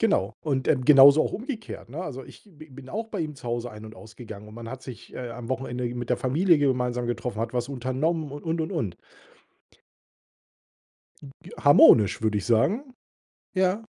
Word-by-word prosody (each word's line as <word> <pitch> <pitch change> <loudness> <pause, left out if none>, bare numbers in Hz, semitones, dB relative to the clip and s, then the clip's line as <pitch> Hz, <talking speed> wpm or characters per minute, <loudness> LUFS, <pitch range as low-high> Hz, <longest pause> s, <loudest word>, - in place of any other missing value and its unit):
Genau. 225 -3 +1
Und, 135 -4 -1
ähm, 130 -4 +2
genauso 140 +2 +8
auch - - -3
umgekehrt, 230 - -6
ne? 145 +8 -7
Also, 135 -7 -6
ich - - -16
b 155 0 -14
bin 130 0 -12
auch 225 +6 -4
bei - - -5
ihm 155 -2 -4
zu 130 -3 -9
Hause 120 +1 -3
ein 105 0 -11
und 110 +1 -11
ausgegangen 110 -2 -11
und 105 - -13
man 115 0 -8
hat 130 +2 -7
sich, 120 -3 -11
äh, 125 -2 -6
am 115 0 -8
Wochenende 125 -2 -3
mit 120 -1 -5
der 125 - +2
Familie 165 +9 +3
gemeinsam 125 -3 0
getroffen, 120 -2 -3
hat 115 0 -3
was 125 0 -2
unternommen 140 +4 -2
und, 145 +1 -9
und, 165 0 -1
und, 160 - -3
und. - - -3 2.3
Hm, 140 - -11 0.3
harmonisch, 110 -8 +6
würde 110 -1 +1
ich 100 - -4
sagen. 210 - +1 0.6
Ja. 190 +3 +1
130 Hz, 190 wpm, -25 LUFS, 120-155 Hz, 2.3 s, genauso